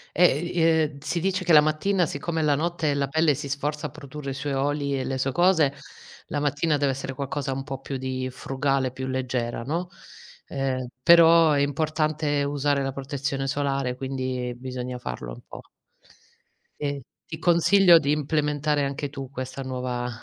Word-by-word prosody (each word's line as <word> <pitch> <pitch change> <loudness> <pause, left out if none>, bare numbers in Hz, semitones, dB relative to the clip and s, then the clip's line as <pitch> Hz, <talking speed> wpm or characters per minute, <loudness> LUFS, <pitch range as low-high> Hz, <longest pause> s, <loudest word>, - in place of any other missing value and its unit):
Eh, 175 -5 +5
i 175 +1 -2
ehm, 160 -3 +2
si 165 +4 -2
dice 185 +1 -1
che 170 - +3
la 150 - +9
mattina 170 +5 +1
siccome 165 -1 -3
la 145 -2 +3
notte 160 -2 0
la 140 -1 0
pelle 155 +1 +2
si 140 0 -6
sforza 150 +2 -2
a - - -7
produrre 150 -1 -8
i 135 - -4
suoi 140 0 -3
oli 140 0 0
e 130 - -2
le 135 -1 -2
sue 135 +1 0
cose, 175 -4 +4 0.6
la 145 - -2
mattina 145 +2 +1
deve 140 -1 +1
essere 135 0 -5
qualcosa 140 0 -3
un 135 +1 -3
po' 135 -1 -6
più 135 0 -5
di 130 0 -3
frugale, 135 0 -1
più 130 0 -5
leggera, 125 -3 -2
no. 170 +7 -3 0.6
Ehm, 130 -3 -2
però 165 -2 +7
è 140 - +2
importante 150 0 0
usare 140 0 0
la 135 - -1
protezione 135 0 -3
solare 135 -2 -1
quindi, 130 -2 -3
bisogna 125 0 -5
farlo - - -6
un - - -11
po'. - - -9 1.2
Ehm, 140 -2 -2 0.2
ti 160 - -7
consiglio 175 +1 +6
di 145 -2 -1
implementare 150 -1 0
anche 140 0 -4
tu 135 -2 -7
questa 130 0 -6
nuova 125 -1 -3
140 Hz, 175 wpm, -25 LUFS, 135-155 Hz, 1.2 s, la